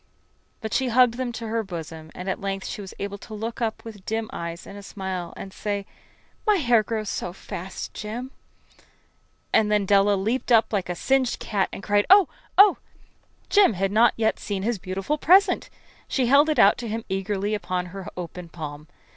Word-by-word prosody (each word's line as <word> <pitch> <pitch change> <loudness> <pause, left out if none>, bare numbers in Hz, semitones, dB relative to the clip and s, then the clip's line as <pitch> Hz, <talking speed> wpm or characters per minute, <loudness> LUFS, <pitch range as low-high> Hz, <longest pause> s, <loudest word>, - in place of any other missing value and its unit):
But 220 -2 -4
she 265 - +1
hugged 245 0 +5
them 255 -1 -2
to 230 0 -6
her 225 +1 0
bosom, 165 -5 -7
and 180 - -7
at 190 - -2
length 195 -1 -3
she - - -5
was 195 - -9
able 200 0 -5
to 215 - -9
look 225 +3 -5
up 225 -1 -2
with 210 -4 -10
dim 220 +1 -3
eyes 170 +1 -5
and - - -10
a 205 - -8
smile 190 -3 -5
and 195 - -8
say: 205 -1 -3 0.6
"My 425 - +5
hair 240 - +4
grows 215 0 -3
so 180 - -3
fast, 185 0 -7
Jim!" 235 +5 -6 1.2
And 210 -1 +4
then 210 -1 +2
Della 200 +1 +4
leaped 225 +7 -1
up 225 -1 +4
like 190 -3 -1
a - - 0
little - - -11
singed 265 -2 +2
cat 200 -3 -1
and 195 - -8
cried, 205 0 +2
"Oh, 390 -2 +8 0.3
Oh!" 400 0 +8 0.7
Jim 405 - +6
had 195 +1 -1
not 225 +2 +4
yet 220 -1 +1
seen 200 -2 -3
his 230 -1 -1
beautiful 195 +11 -3
present. 380 +6 +4 0.4
She 260 - +1
held 280 +5 +5
it 310 - +1
out 200 - +6
to 240 - -5
him 225 +1 -4
eagerly 195 +2 -2
upon 185 -3 -2
her 195 -2 -7
open 180 0 -7
palm. 150 -2 -7
205 Hz, 195 wpm, -25 LUFS, 190-235 Hz, 1.2 s, Oh